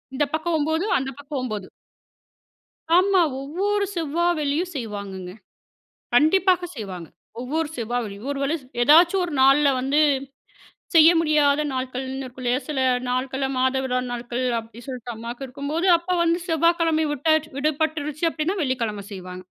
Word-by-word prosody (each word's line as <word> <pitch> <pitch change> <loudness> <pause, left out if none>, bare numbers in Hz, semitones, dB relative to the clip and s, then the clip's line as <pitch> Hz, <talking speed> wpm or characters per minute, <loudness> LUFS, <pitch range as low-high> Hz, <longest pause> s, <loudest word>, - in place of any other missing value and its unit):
இந்த 295 - +2
பக்கம் 320 +1 0
9 315 +4 0
அந்த 270 0 -3
பக்கம் 285 -1 -5
9. 215 -6 -4 1.3
ஆமா. 380 0 +4 0.2
ஒவ்வொரு 400 +8 -1
செவ்வா 335 0 -1
வெள்ளியும் 305 +5 -1
செய்வாங்கங்க. 200 -6 -6 0.8
கண்டிப்பாக 360 +5 +4
செய்வாங்க. 185 -7 -7 0.3
ஒவ்வொரு 300 +5 -2
செவ்வா 240 +1 -2
வெள்ளியும் 205 +5 -7
ஒரு 275 - -5
வேளை 290 +4 0 0.3
ஏதாச்சும் 340 +8 +5
ஒரு 340 - -6
நாள்ல 275 +2 +5
வந்து 275 +3 +1 1.0
செய்ய 325 +1 +8
முடியாத 300 -2 +3
நாட்கள்ன்னு 260 +1 -4
இருக்குல்லயா, 250 0 -2
சில 295 -4 -2 0.3
நாட்கள் 260 +2 -1
மாத 260 0 +2
விடாய் 250 -1 0
நாட்கள் 245 +1 -3
அப்டின்னு 225 +1 -10
சொல்லிட்டு 250 -2 -6
அம்மாவுக்கு 235 +4 -7
இருக்கும்போது, 285 +6 -3
அப்போ 340 +2 -4
வந்து 335 0 +2
செவ்வாய்கிழமை 330 -1 +2
விட்டா 295 +3 +1 0.2
விடுபட்டுருச்சு. 305 +1 -1
அப்டின்னா 325 +5 -2
வெள்ளிக்கிழமை 230 -7 -2
செய்வாங்க. 185 -1 -8
280 Hz, 130 wpm, -23 LUFS, 250-320 Hz, 1.3 s, செய்ய